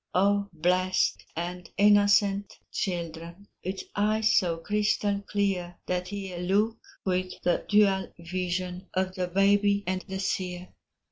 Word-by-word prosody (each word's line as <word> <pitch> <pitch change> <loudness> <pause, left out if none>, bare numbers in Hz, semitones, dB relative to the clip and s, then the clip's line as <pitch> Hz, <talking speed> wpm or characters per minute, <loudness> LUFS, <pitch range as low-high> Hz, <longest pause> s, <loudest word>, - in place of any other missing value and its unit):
Oh, 200 +2 +3
blessed 180 +3 +1
and 175 +1 -5
innocent 205 0 +4
children, 170 +1 -4 0.2
With 190 +2 -4
eyes 215 +2 +2
so 175 -4 +2
crystal 205 +2 0
clear, 190 -4 -1
That 180 +1 -2
ye 195 -3 -5
look 205 +5 +1 0.3
with 185 -1 -1
the 175 - +1
dual 200 -2 +3
vision 180 +1 -3
Of 185 0 0
the 185 -1 -2
baby 200 +2 +3
and 185 0 -2
the 190 -1 -4
seer. 180 -2 -3
185 Hz, 125 wpm, -28 LUFS, 180-205 Hz, 0.3 s, innocent